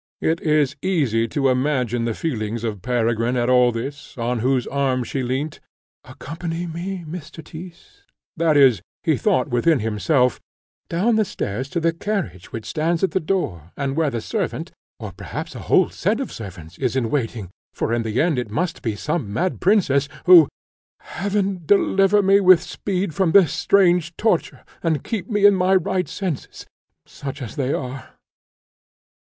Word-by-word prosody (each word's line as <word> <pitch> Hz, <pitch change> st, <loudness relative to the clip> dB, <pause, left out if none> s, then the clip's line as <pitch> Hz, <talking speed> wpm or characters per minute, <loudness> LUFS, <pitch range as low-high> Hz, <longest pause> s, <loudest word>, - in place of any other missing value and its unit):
It 165 Hz, +1 st, 0 dB
is 150 Hz, -3 st, +2 dB
easy 135 Hz, -, +1 dB
to 135 Hz, +3 st, +1 dB
imagine 125 Hz, -3 st, 0 dB
the 115 Hz, -2 st, -2 dB
feelings 115 Hz, -7 st, -3 dB
of 105 Hz, -5 st, -3 dB
Peregrine 120 Hz, +1 st, 0 dB
at 120 Hz, +1 st, +1 dB
all 125 Hz, -1 st, +5 dB
this, 140 Hz, +5 st, -7 dB
on 120 Hz, 0 st, -1 dB
whose 130 Hz, +1 st, +1 dB
arm 135 Hz, -2 st, 0 dB
she 135 Hz, +2 st, -3 dB
leant. 130 Hz, +5 st, -3 dB, 0.4 s
"Accompany 165 Hz, +2 st, -6 dB
me, 175 Hz, +2 st, -5 dB
Mr. 160 Hz, 0 st, -8 dB
Tyss," 185 Hz, -, -12 dB, 0.3 s
that 160 Hz, -2 st, +2 dB
is, 130 Hz, -9 st, +5 dB, 0.2 s
he -, -, +2 dB
thought -, -, +1 dB
within 130 Hz, +7 st, +3 dB
himself, 125 Hz, +4 st, +1 dB, 0.5 s
down 215 Hz, +7 st, +2 dB
the 215 Hz, -, +4 dB
stairs 130 Hz, -, -4 dB
to 170 Hz, -, -1 dB
the 165 Hz, 0 st, +1 dB
carriage 165 Hz, -, -4 dB
which 115 Hz, -2 st, -6 dB
stands 165 Hz, +2 st, -1 dB
at 190 Hz, -, +2 dB
the -, -, +1 dB
door, 95 Hz, -, -2 dB
and 140 Hz, -1 st, -2 dB
where 160 Hz, -2 st, +2 dB
the 120 Hz, -4 st, -3 dB
servant, -, -, -3 dB, 0.3 s
or -, -, -6 dB
perhaps -, -, -7 dB
a -, -, -8 dB
whole -, -, +4 dB
set -, -, 0 dB
of -, -, -4 dB
servants, 90 Hz, -5 st, -10 dB
is 130 Hz, -2 st, -1 dB
in 120 Hz, -4 st, 0 dB
waiting, 115 Hz, -9 st, -2 dB, 0.2 s
for 115 Hz, -, -2 dB
in 120 Hz, -, +1 dB
the 110 Hz, +1 st, -2 dB
end 155 Hz, -5 st, +2 dB
it 120 Hz, -, -4 dB
must 170 Hz, -, -2 dB
be 110 Hz, -3 st, -2 dB
some 140 Hz, -2 st, -3 dB
mad 180 Hz, -, -1 dB
princess, 150 Hz, -8 st, +3 dB, 0.2 s
who 175 Hz, -5 st, +8 dB, 0.5 s
Heaven 195 Hz, 0 st, -2 dB
deliver 195 Hz, +3 st, +3 dB
me 195 Hz, +1 st, +5 dB
with 185 Hz, -3 st, +6 dB
speed 185 Hz, -2 st, -3 dB
from 170 Hz, 0 st, +1 dB
this 180 Hz, -7 st, +6 dB
strange 175 Hz, -1 st, +2 dB
torture, 215 Hz, -6 st, 0 dB, 0.2 s
and 160 Hz, -5 st, 0 dB
keep 225 Hz, -1 st, -4 dB
me 205 Hz, -2 st, +2 dB
in 205 Hz, -, +8 dB
my 185 Hz, 0 st, +3 dB
right 185 Hz, 0 st, 0 dB
senses, 180 Hz, -9 st, -5 dB, 0.4 s
such 140 Hz, 0 st, -7 dB
as 120 Hz, -6 st, -7 dB
they 135 Hz, -1 st, -1 dB
are! 130 Hz, -1 st, -5 dB
150 Hz, 170 wpm, -22 LUFS, 120-180 Hz, 0.5 s, who